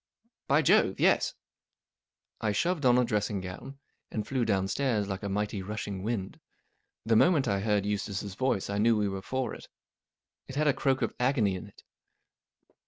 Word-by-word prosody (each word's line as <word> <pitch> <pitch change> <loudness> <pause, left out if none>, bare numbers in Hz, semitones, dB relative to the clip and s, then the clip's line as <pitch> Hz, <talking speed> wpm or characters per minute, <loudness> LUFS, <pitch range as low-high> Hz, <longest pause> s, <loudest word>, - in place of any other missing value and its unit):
" 235 - -52
By 145 +3 +3
Jove, - - +3
yes! - - +3 0.5
" - - -37
I 105 -2 0
shoved 160 - +1
on 125 0 +5
a 125 - +3
dressing 105 -2 -1
gown, 95 +9 -8 0.3
and 105 -2 -4
flew 130 -3 0
downstairs 105 +2 0
like 95 -1 -4
a 100 - -3
mighty, 105 0 -2
rushing 100 -1 -5
wind. 105 -2 -3 0.7
The 115 0 +3
moment 145 0 +4
I 100 -2 +1
heard 105 -1 +1
Eustace's 105 -1 -3
voice 125 -3 0
I 100 0 -2
knew 115 +1 +4
we 105 -1 +1
were 95 -1 -4
for 130 +5 -3
it. - - -10 0.8
It 130 - -8
had 150 +1 +1
a 145 - +5
croak 135 -1 +1
of - - -1
agony 125 -6 +2
in 95 +3 -7
it. 100 - -18
105 Hz, 180 wpm, -29 LUFS, 100-130 Hz, 0.8 s, on